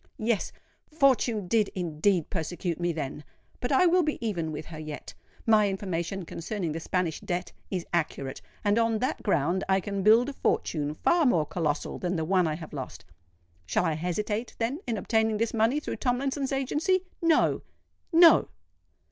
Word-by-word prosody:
Yes—Fortune 235 - 0
did 215 +1 +3
indeed 175 0 0
persecute 170 0 -3
me 175 0 +1
then! 150 -2 -5 0.4
But 245 - -2
I 280 +7 +5
will 360 +1 +5
be 305 -2 -1
even 175 -9 -2
with 155 0 -6
her 155 -2 -9
yet. 155 -1 -7 0.3
My 215 -2 +5
information 190 -1 -3
concerning 170 +1 -4
the 160 - -3
Spanish 170 -1 -1
debt 180 0 -3 0.2
is 180 -3 -3
accurate; 140 -5 -2 0.2
and 205 +2 +3
on 230 -1 +2
that 255 +4 -2
ground 175 -1 +1
I 190 0 +4
can 200 +1 -3
build 225 +5 +5
a - - -5
fortune 150 - -1
far 340 - +3
more 165 -11 +3
colossal 150 -2 -2
than 180 0 -1
the 160 -2 -1
one 180 0 +3
I 155 - -1
have 160 -1 -9
lost. 135 -3 -7 0.6
Shall - - +1
I 160 - +1
hesitate, 210 +8 -2
then, 240 +6 -1
in 230 -2 -1
obtaining 220 +2 +1
this 230 +1 -1
money 230 +6 +2
through - - -5
Tomlinson's 270 +2 -1
agency? 300 +8 +1 0.2
No—no!" 330 0 +3
195 Hz, 165 wpm, -28 LUFS, 165-240 Hz, 0.6 s, I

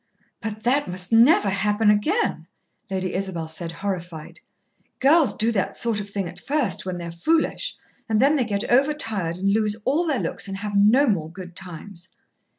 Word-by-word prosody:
"But 220 -1 -5
that 275 +4 +2
must 180 +1 -3
never 225 -3 +5
happen 210 +2 +2
again," 315 - 0 0.4
Lady 185 -1 -2
Isabel 185 -4 -3
said, 165 +1 -4
horrified. 175 -3 -6 0.6
"Girls 280 -2 +4
do 220 +3 0
that 195 -5 -1
sort 230 -3 0
of 205 0 -6
thing 200 -2 -3
at 175 +1 -10
first, 250 -11 -1
when 185 -1 -3
they're 170 -1 -6
foolish, 320 - 0 0.3
and 215 -1 +2
then 280 +5 +4
they 270 - +2
get 205 -2 -2
over 275 +5 +3
tired 200 - -2
and 195 +2 +1
lose 215 0 +1
all 325 +6 +1
their 290 -4 +1
looks - - -3
and 195 0 -5
have 205 0 -4
no 215 +8 +5
more 180 - 0
good 180 -1 -10
times." 185 0 -9
205 Hz, 180 wpm, -23 LUFS, 185-240 Hz, 0.6 s, never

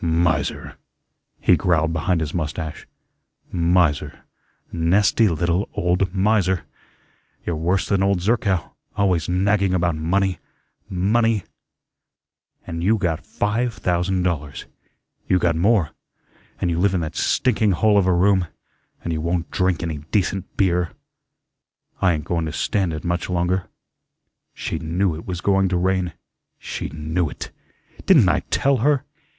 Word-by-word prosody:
"Miser," 80 -3 0 0.6
he - - +4
growled 80 -2 +1
behind 85 +2 0
his 80 0 -3
mustache. 80 -1 -4 0.6
"Miser, 85 -3 +1 0.5
nasty 95 +6 +3
little 85 +3 0
old 90 +1 +1
miser. 95 -2 +1 0.8
You're 85 - -1
worse 90 +4 0
than 100 -2 +1
old 100 -1 +2
Zerkow, 100 -3 0 0.3
always 90 -6 +1
nagging 95 +1 +2
about 85 -2 +1
money, 90 +3 0 0.5
money, 105 +3 +1 1.2
and 85 0 -5
you 110 +4 +3
got 85 -6 -1
five 115 +3 -1
thousand 90 +1 0
dollars. 75 -6 -3 0.6
You 95 - +3
got 85 -2 +1
more, 95 -1 +2 0.7
an' 90 - 0
you 85 0 0
live 95 +1 +2
in 90 - 0
that 80 - -5
stinking 110 -5 +2
hole 105 +3 +4
of 95 - +1
a - - +4
room, 95 0 +3 0.6
and 85 - -2
you 80 - -2
won't 85 0 -2
drink 90 -2 0
any 80 -3 -3
decent 95 -2 -1
beer. 90 -3 +1 1.1
I 90 -2 +4
ain't 75 -3 -4
going 85 -2 -1
to - - -3
stand 95 +1 0
it 75 -1 -5
much 85 +1 -2
longer. 90 +1 0 0.9
She 80 - -3
knew 85 +3 0
it 80 - -9
was 90 -2 -4
going 95 0 +2
to 90 - 0
rain. 90 -1 0 0.4
She - - -5
KNEW 80 +3 -2
it. - - -8 0.6
Didn't 150 - +6
I 75 -3 +2
TELL 140 0 +2
her? 140 +3 +2
90 Hz, 140 wpm, -22 LUFS, 85-100 Hz, 1.2 s, Didn't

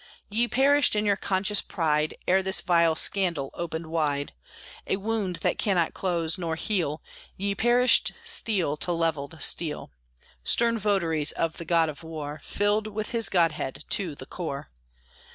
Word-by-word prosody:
Ye 235 +3 +1
perished 275 0 +3
in 210 0 +1
your 200 -1 +3
conscious 200 +1 +1
pride, 155 -3 -1
Ere 190 +1 +4
this 190 0 +1
vile 170 -2 +3
scandal 170 -8 +1
opened 165 -1 -5
wide 150 -3 -1 0.5
A - - +1
wound 205 -2 -2
that - - 0
cannot 180 -6 +1
close 170 -3 -1
nor 165 -2 -2
heal. 165 -4 -1 0.3
Ye 200 +1 -1
perished 240 +4 +3
steel 215 - +2
to 175 - 0
levelled 165 -2 -2
steel, 155 -3 0 0.5
Stern 230 - +2
votaries 170 -8 +1
of 165 -1 -2
the 170 - -7
god 165 -1 +3
of 150 -2 -7
war, 155 -2 -7
Filled 205 +1 0
with 215 +2 -4
his 230 -3 +2
godhead 160 -5 0
to 175 -7 0
the 130 - -9
core! 140 - -6
175 Hz, 150 wpm, -26 LUFS, 160-205 Hz, 0.5 s, Ere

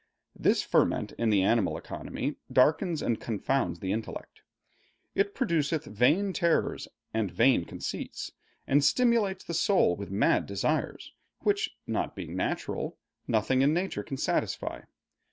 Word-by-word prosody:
This - - +2
ferment - - +1
in 115 -1 +2
the 100 -3 +4
animal 110 0 +2
economy - - -5
darkens 160 +5 +3
and 115 -2 0
confounds 105 -5 -1
the 95 - -2
intellect. 110 +2 -5 0.7
It 200 +1 0
produceth 160 - 0
vain 150 - +2
terrors 170 -2 +1 0.3
and 110 -3 0
vain 115 -2 +3
conceits, - - -5 0.3
and 140 +1 +3
stimulates 225 - +2
the 170 - -6
soul 170 - +3
with 100 +1 -7
mad 100 +2 +2
desires, 100 +11 -2 0.3
which, 415 +1 0
not - - -2
being - - -6
natural, - - -2 0.3
nothing 120 +3 +2
in 145 +3 +4
nature 185 +2 -1
can 135 - -6
satisfy. - - -1
135 Hz, 135 wpm, -29 LUFS, 110-180 Hz, 0.7 s, the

